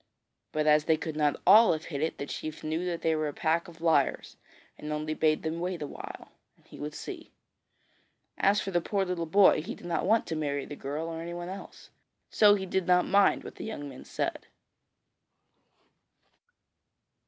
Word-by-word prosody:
But 155 Hz, 0 st, 0 dB
as 150 Hz, 0 st, +4 dB
they 160 Hz, -1 st, +3 dB
could 160 Hz, 0 st, -5 dB
not 150 Hz, -2 st, +1 dB
all 220 Hz, -1 st, +8 dB
have 155 Hz, +1 st, -5 dB
hit 140 Hz, -, -2 dB
it, 160 Hz, -, -1 dB
the 140 Hz, -, -4 dB
chief 155 Hz, +2 st, -6 dB
knew 160 Hz, +3 st, -2 dB
that 175 Hz, -2 st, -3 dB
they 160 Hz, -1 st, +2 dB
were 155 Hz, -1 st, -1 dB
a 145 Hz, -, -4 dB
pack 165 Hz, +4 st, 0 dB
of 165 Hz, -1 st, -14 dB
liars 160 Hz, -5 st, +1 dB, 0.4 s
and 150 Hz, -, -7 dB
only 155 Hz, +1 st, -2 dB
bade 155 Hz, 0 st, +1 dB
them 160 Hz, +1 st, -3 dB
wait 175 Hz, -2 st, -3 dB
a -, -, -2 dB
while, -, -, -9 dB, 0.3 s
and -, -, -30 dB
he -, -, -13 dB
would 150 Hz, +1 st, -5 dB
see. 350 Hz, -4 st, -8 dB, 1.1 s
As 200 Hz, +2 st, +3 dB
for 195 Hz, -, -4 dB
the 175 Hz, -1 st, +1 dB
poor 195 Hz, +2 st, -1 dB
little 175 Hz, -2 st, -3 dB
boy, 190 Hz, -2 st, +5 dB
he 215 Hz, +10 st, -6 dB
did -, -, -14 dB
not 175 Hz, +1 st, -1 dB
want 220 Hz, +2 st, +3 dB
to 165 Hz, -, -3 dB
marry 145 Hz, -3 st, -2 dB
the 145 Hz, -, -8 dB
girl 145 Hz, +3 st, -4 dB
or 165 Hz, 0 st, -5 dB
anyone 175 Hz, +1 st, -6 dB
else, 195 Hz, +1 st, -10 dB, 0.4 s
so 205 Hz, -1 st, +6 dB
he 190 Hz, -2 st, -3 dB
did 190 Hz, -1 st, -1 dB
not 180 Hz, 0 st, +4 dB
mind 200 Hz, +1 st, +3 dB
what -, -, -10 dB
the -, -, -7 dB
young 215 Hz, -10 st, -5 dB
men 135 Hz, -2 st, -10 dB
said. -, -, -4 dB
165 Hz, 200 wpm, -29 LUFS, 155-185 Hz, 1.1 s, all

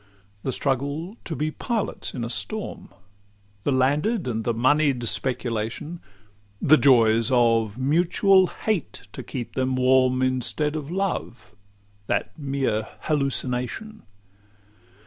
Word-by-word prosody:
The 130 Hz, -, -2 dB
struggle 145 Hz, -, -2 dB
to 165 Hz, -, -4 dB
be 150 Hz, +4 st, -1 dB
pilots 225 Hz, -, -3 dB
in 120 Hz, -, -3 dB
a 115 Hz, -, -3 dB
storm? 215 Hz, -, -3 dB, 0.8 s
The -, -, +2 dB
landed 145 Hz, -, +1 dB
and 115 Hz, -2 st, -2 dB
the 120 Hz, -, +2 dB
monied 130 Hz, +2 st, +2 dB
speculation? 120 Hz, +6 st, -1 dB, 0.6 s
The 155 Hz, -, +5 dB
joys 115 Hz, -5 st, +4 dB
of 115 Hz, -3 st, +2 dB
mutual 180 Hz, +7 st, +3 dB
hate 210 Hz, -6 st, -3 dB
to -, -, -7 dB
keep 125 Hz, -3 st, -6 dB
them 130 Hz, 0 st, 0 dB
warm, 130 Hz, 0 st, +3 dB
Instead 130 Hz, +4 st, -1 dB
of 150 Hz, -2 st, -5 dB
love, 185 Hz, -9 st, -3 dB, 0.6 s
that -, -, -1 dB
mere 135 Hz, -7 st, -1 dB
hallucination? 140 Hz, -, -1 dB
135 Hz, 115 wpm, -24 LUFS, 125-155 Hz, 0.8 s, The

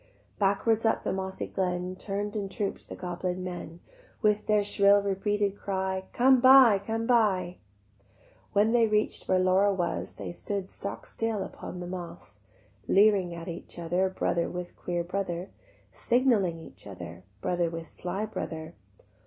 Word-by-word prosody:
Backwards 205 Hz, +3 st, +2 dB
up 225 Hz, -, +2 dB
the -, -, -1 dB
mossy 190 Hz, 0 st, -3 dB
glen 180 Hz, -1 st, -2 dB
Turn'd 205 Hz, +2 st, -4 dB
and 200 Hz, -2 st, -2 dB
troop'd 200 Hz, +1 st, -4 dB
the -, -, -6 dB
goblin 180 Hz, 0 st, -3 dB
men, 175 Hz, -2 st, -7 dB, 0.4 s
With 210 Hz, 0 st, +2 dB
their 210 Hz, -1 st, +3 dB
shrill 200 Hz, 0 st, +5 dB
repeated 200 Hz, 0 st, 0 dB
cry, 190 Hz, -1 st, -2 dB
"Come 255 Hz, 0 st, +5 dB
buy, 255 Hz, -5 st, +8 dB
come 225 Hz, +1 st, -2 dB
buy." 195 Hz, -7 st, +2 dB, 0.9 s
When 210 Hz, +2 st, +3 dB
they 235 Hz, -1 st, +4 dB
reach'd 215 Hz, 0 st, 0 dB
where 185 Hz, -, +3 dB
Laura 185 Hz, +2 st, +4 dB
was 180 Hz, -3 st, -2 dB
They -, -, -6 dB
stood 195 Hz, +2 st, -4 dB
stock 200 Hz, -, -6 dB
still 225 Hz, -3 st, -2 dB
upon 180 Hz, -, -8 dB
the -, -, -5 dB
moss, 175 Hz, -, -8 dB, 0.5 s
Leering 195 Hz, -4 st, +4 dB
at 170 Hz, 0 st, -8 dB
each 170 Hz, 0 st, -7 dB
other, 175 Hz, +3 st, 0 dB
Brother 170 Hz, -2 st, 0 dB
with 180 Hz, 0 st, -6 dB
queer 175 Hz, -1 st, -2 dB
brother; 180 Hz, 0 st, -3 dB, 0.4 s
Signalling 235 Hz, -9 st, +2 dB
each 160 Hz, -, -12 dB
other, 90 Hz, -2 st, -9 dB, 0.2 s
Brother 175 Hz, -1 st, 0 dB
with 165 Hz, 0 st, -6 dB
sly 185 Hz, +5 st, -4 dB
brother. 160 Hz, -6 st, -6 dB
190 Hz, 150 wpm, -28 LUFS, 175-210 Hz, 0.9 s, buy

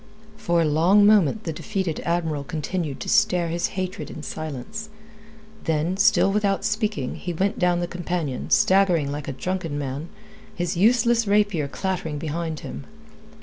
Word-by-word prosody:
For 170 Hz, -5 st, +1 dB
a -, -, +1 dB
long 170 Hz, +7 st, +4 dB
moment 210 Hz, 0 st, +4 dB
the 165 Hz, -, -3 dB
defeated 190 Hz, -1 st, -3 dB
Admiral 160 Hz, -4 st, -1 dB
continued 155 Hz, 0 st, -3 dB
to -, -, -5 dB
stare 175 Hz, -2 st, +3 dB
his 170 Hz, +1 st, 0 dB
hatred 185 Hz, 0 st, -3 dB
in 155 Hz, -, -8 dB
silence, 155 Hz, -, -6 dB, 0.8 s
then, 160 Hz, +2 st, 0 dB
still 200 Hz, -1 st, +4 dB
without 200 Hz, -1 st, 0 dB
speaking, 210 Hz, -, -1 dB
he 175 Hz, -, -4 dB
went 195 Hz, +4 st, -1 dB
down 175 Hz, -1 st, +2 dB
the 175 Hz, -, -1 dB
companion, 175 Hz, -6 st, -3 dB
staggering 180 Hz, -7 st, +3 dB
like 145 Hz, 0 st, -5 dB
a -, -, -2 dB
drunken 165 Hz, +2 st, -3 dB
man, 145 Hz, +3 st, -4 dB, 0.5 s
his 175 Hz, 0 st, -2 dB
useless 230 Hz, +3 st, +3 dB
rapier 200 Hz, -7 st, +2 dB
clattering 180 Hz, -1 st, -3 dB
behind 160 Hz, +1 st, -3 dB
him. 70 Hz, +3 st, -7 dB
175 Hz, 150 wpm, -24 LUFS, 155-195 Hz, 0.8 s, long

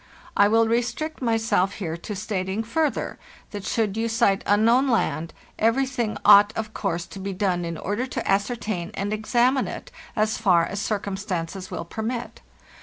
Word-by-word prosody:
I 200 Hz, -, +6 dB
will 225 Hz, +1 st, +4 dB
restrict 245 Hz, +8 st, -1 dB
myself 225 Hz, -5 st, +1 dB
here 165 Hz, -6 st, -4 dB
to 185 Hz, +5 st, -6 dB
stating, 195 Hz, 0 st, -2 dB
further, 295 Hz, +6 st, -1 dB, 0.3 s
that 205 Hz, -2 st, -6 dB
should 215 Hz, -1 st, 0 dB
you 225 Hz, +1 st, -1 dB
sight 220 Hz, -4 st, +2 dB
unknown 230 Hz, +6 st, +4 dB
land, 170 Hz, -9 st, 0 dB, 0.3 s
everything 240 Hz, 0 st, +1 dB
ought, 205 Hz, 0 st, +8 dB
of 220 Hz, -1 st, -4 dB
course, 170 Hz, -4 st, -2 dB
to 195 Hz, -, -10 dB
be 195 Hz, 0 st, -4 dB
done 185 Hz, -2 st, 0 dB
in 170 Hz, -1 st, -4 dB
order 205 Hz, +10 st, -2 dB
to -, -, -4 dB
ascertain 200 Hz, -3 st, -1 dB
and 200 Hz, +2 st, -2 dB
examine 245 Hz, +4 st, +2 dB
it, -, -, -7 dB, 0.2 s
as 220 Hz, -1 st, +1 dB
far 180 Hz, -6 st, +4 dB
as 200 Hz, +1 st, -4 dB
cir 215 Hz, 0 st, 0 dB
cumstances 190 Hz, -2 st, -4 dB
will 165 Hz, -, -5 dB
permit. 230 Hz, +6 st, -4 dB
210 Hz, 165 wpm, -24 LUFS, 195-230 Hz, 0.3 s, ought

